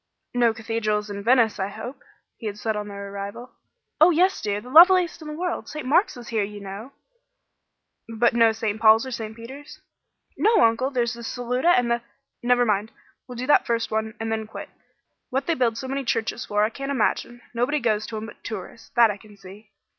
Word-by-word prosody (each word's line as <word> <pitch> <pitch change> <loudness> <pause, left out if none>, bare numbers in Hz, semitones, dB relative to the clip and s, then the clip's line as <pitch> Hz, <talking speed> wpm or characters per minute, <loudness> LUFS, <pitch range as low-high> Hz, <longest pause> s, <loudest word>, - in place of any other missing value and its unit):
"No 240 -2 +3
cathedrals 215 -2 -2
in 200 0 -5
Venice, 230 -2 +3
I 190 - 0
hope?" 240 +6 -8 0.4
he 225 - -6
had 205 -1 -5
said 220 0 -2
on 210 0 -4
their 200 -1 -7
arrival. 200 +5 -7 0.5
"Oh, 320 +3 +8
yes, 360 +3 +2
dear; 205 -1 -1
the 240 - -13
loveliest 345 +1 +6
one 305 - -8
in 300 - -5
the - - -9
world! 360 -1 -3
St. 305 -3 -6
Mark's 300 +4 +2
is 240 - -10
here, 225 -2 0
you 205 +1 -5
know." 200 +6 -8 1.2
"But 230 +1 +2
no 230 -1 +5
St. 220 -1 -3
Paul's 220 +2 +6
or 260 - -6
St. 220 -2 -5
Peter's?" 265 +6 -11 0.6
"No, 435 -3 +4
Uncle. 230 +4 +1
There's 245 -3 0
the 235 - -9
Saluta, 245 +6 -1
and 240 -1 +1
the 235 0 +1 0.2
" - - -57
"Never 245 0 +3
mind. 210 0 0 0.4
We'll 250 - -8
do 245 +2 -4
that 295 - +4
first 230 -1 -1
one, 220 0 -2
and 225 0 -3
then 220 -1 -2
quit. 220 - -8 0.6
What 270 +2 -1
they 335 - +1
build 240 -6 0
so 260 - -5
many 275 +1 -2
churches 230 0 -2
for 210 0 +1
I 215 - +1
can't 275 +3 -6
imagine. 240 -1 -1
Nobody 245 +6 0
goes 215 -4 0
to 220 - -5
'em 215 - -5
but 225 - -13
tourists, 220 0 -8
that 235 -3 +6
I 205 - -7
can 210 0 -17
see." 195 +2 -14
230 Hz, 215 wpm, -24 LUFS, 215-255 Hz, 1.2 s, Oh